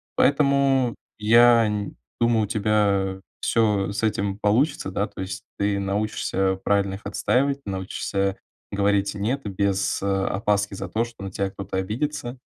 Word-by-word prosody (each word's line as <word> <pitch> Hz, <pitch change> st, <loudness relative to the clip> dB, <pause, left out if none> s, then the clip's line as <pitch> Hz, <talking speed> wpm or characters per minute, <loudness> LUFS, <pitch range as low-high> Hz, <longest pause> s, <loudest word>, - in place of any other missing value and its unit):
поэтому, 140 Hz, -3 st, +3 dB, 0.2 s
я 115 Hz, +2 st, +6 dB
н 105 Hz, -2 st, -3 dB, 0.3 s
думаю, 115 Hz, -2 st, +3 dB
у -, -, -2 dB
тебя 100 Hz, -3 st, +1 dB, 0.2 s
всё 105 Hz, -4 st, +1 dB
с 105 Hz, +2 st, -4 dB
этим 100 Hz, -2 st, 0 dB
получится, 110 Hz, +1 st, +1 dB
да. 100 Hz, +3 st, -1 dB
То 100 Hz, -2 st, -9 dB
есть 95 Hz, 0 st, -5 dB
ты 100 Hz, 0 st, 0 dB
научишься 95 Hz, -1 st, -1 dB
правильно 100 Hz, -1 st, +1 dB
их 100 Hz, -, -10 dB
отстаивать, 135 Hz, +7 st, 0 dB
научишься 95 Hz, 0 st, -2 dB, 0.3 s
говорить 100 Hz, 0 st, +1 dB
"нет" 115 Hz, +7 st, -1 dB
без, 100 Hz, 0 st, 0 dB
э, -, -, -1 dB
опаски 100 Hz, +1 st, 0 dB
за 95 Hz, -1 st, -5 dB
то, 110 Hz, +5 st, 0 dB
что 115 Hz, -4 st, -9 dB
на 95 Hz, -, -5 dB
тебя 95 Hz, 0 st, -1 dB
кто-то 95 Hz, -1 st, -6 dB
обидится, 120 Hz, +6 st, -3 dB
100 Hz, 150 wpm, -24 LUFS, 100-115 Hz, 0.3 s, я